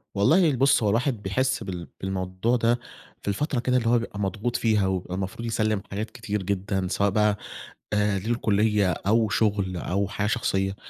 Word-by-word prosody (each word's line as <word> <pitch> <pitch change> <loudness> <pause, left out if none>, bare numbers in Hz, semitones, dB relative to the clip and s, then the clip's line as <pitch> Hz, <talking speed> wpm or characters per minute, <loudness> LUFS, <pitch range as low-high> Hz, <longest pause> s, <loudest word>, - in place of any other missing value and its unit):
والله 160 - +4
ال 140 - 0
بُص 135 -2 +4
هو 105 - +3
الواحد 115 +1 0
بيحس 130 +5 0
بال 90 -4 -6
بالموضوع 95 +4 -1
ده، 120 0 +2 0.4
في - - -13
الفترة 125 +6 0
كده 125 +1 +1
اللي 115 -2 0
هو 120 0 +4
بيبقى 110 -3 -6
مضغوط 105 +4 -2
فيها 110 -5 +2
ويبقى 95 -1 -2
المفروض 95 +5 -4
يسلِّم 110 -2 0
حاجات 105 +3 -4
كتير 105 -5 -4
جدًا، 95 0 -1
سواء 100 +2 +1
بقى، 105 +1 +2 0.6
آآ، 105 -1 +2
للكلية 105 -2 +1
أو 110 +6 +1
شغل 100 -4 0
أو 95 +3 -1
حاجة 105 0 -2
شخصية، 95 -2 0
105 Hz, 175 wpm, -25 LUFS, 95-115 Hz, 0.6 s, والله